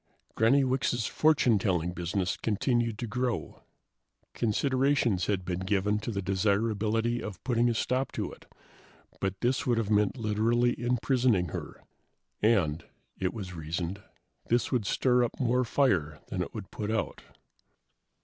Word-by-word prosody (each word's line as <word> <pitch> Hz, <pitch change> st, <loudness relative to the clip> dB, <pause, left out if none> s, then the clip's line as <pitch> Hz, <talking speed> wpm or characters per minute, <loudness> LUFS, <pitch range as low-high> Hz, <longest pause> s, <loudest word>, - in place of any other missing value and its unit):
Granny 130 Hz, +5 st, +4 dB
Wicks' 130 Hz, -3 st, 0 dB
fortunetelling 100 Hz, -, +2 dB
business 90 Hz, +1 st, -1 dB
continued 115 Hz, +1 st, 0 dB
to 120 Hz, -, -3 dB
grow. 125 Hz, +1 st, -3 dB, 0.7 s
Considerations 130 Hz, -, +1 dB
had 95 Hz, -3 st, -1 dB
been 90 Hz, 0 st, -2 dB
given 100 Hz, +2 st, 0 dB
to 105 Hz, -, -5 dB
the 100 Hz, -4 st, -2 dB
desirability 110 Hz, +4 st, +1 dB
of 100 Hz, -4 st, -7 dB
putting 120 Hz, -1 st, +2 dB
a 115 Hz, -, 0 dB
stop 130 Hz, +4 st, 0 dB
to -, -, -3 dB
it, -, -, -16 dB, 0.7 s
but 95 Hz, 0 st, -2 dB
this 125 Hz, +2 st, 0 dB
would 120 Hz, -2 st, +2 dB
have 110 Hz, -2 st, -1 dB
meant 105 Hz, +3 st, +2 dB
literally 115 Hz, +2 st, +2 dB
imprisoning 120 Hz, -, +2 dB
her, -, -, -7 dB, 0.6 s
and, 90 Hz, -8 st, +2 dB, 0.4 s
it 90 Hz, -1 st, 0 dB
was 95 Hz, -4 st, -7 dB
reasoned, 85 Hz, +4 st, -4 dB, 0.5 s
this 120 Hz, +1 st, +1 dB
would 120 Hz, -6 st, 0 dB
stir 125 Hz, +2 st, +3 dB
up 120 Hz, -, -3 dB
more 125 Hz, -1 st, +2 dB
fire 95 Hz, -, +1 dB
than -, -, -2 dB
it -, -, -4 dB
would -, -, -8 dB
put 105 Hz, -, -4 dB
out. 110 Hz, -9 st, -2 dB
110 Hz, 140 wpm, -29 LUFS, 95-120 Hz, 0.7 s, Granny